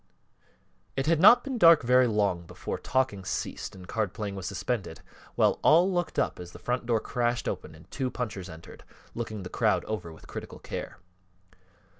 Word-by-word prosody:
It 135 - -1
had 165 0 +3
not 210 +7 +8
been 265 -4 -4
dark 165 -6 +7
very 125 +1 +5
long 100 -6 0
before - - -5
talking 130 -7 0
ceased 95 - -4
and 90 -1 -12
card 110 -3 -2
playing 105 -2 -4
was 95 -2 -5
suspended 100 -10 -3 0.3
while - - +3
all 175 +5 +5
looked 175 -1 -2
up - - 0
as 90 0 -9
the - - -9
front 125 -1 -2
door 115 -2 +2
crashed 120 +1 -1
open 80 - -4
and 80 +1 -16
two 130 -2 -2
punchers 105 -8 -5
entered, 80 0 -12 0.3
looking 110 -4 -5
the - - -5
crowd - - +1
over 105 -6 -4
with 80 - -14
critical - - -8
care. - - -6
115 Hz, 180 wpm, -28 LUFS, 95-130 Hz, 0.3 s, not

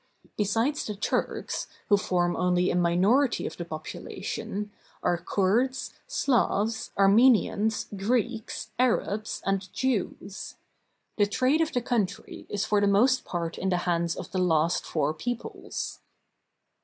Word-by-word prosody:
Besides 225 +8 +1
the 210 - -4
Turks, 200 - -2 0.2
who 205 - +7
form 175 -3 +1
only 180 0 +2
a - - -1
minority 190 +10 +3
of - - -4
the 175 - -5
population, 180 +5 -5 0.3
are 175 - +3
Kurds, 210 +9 0
Slavs, 225 - +1
Armenians, 220 +1 +4
Greeks, 225 +2 -1
Arabs, 220 -4 0
and 195 -1 -1
Jews. 205 -5 -2 0.6
The 205 - +5
trade 255 +8 +2
of 320 - +1
the 245 - 0
coun 230 -5 +2
try 210 +4 -11
is 205 0 -1
for 210 -1 +2
the 205 - +3
most 245 +6 +3
part 170 -2 -3
in 190 - 0
the 180 - +2
hands 170 -1 +1
of - - -7
the 185 - -1
last 165 -2 +2
four 155 -1 0
peoples. 240 +9 -5
205 Hz, 135 wpm, -27 LUFS, 180-235 Hz, 0.6 s, who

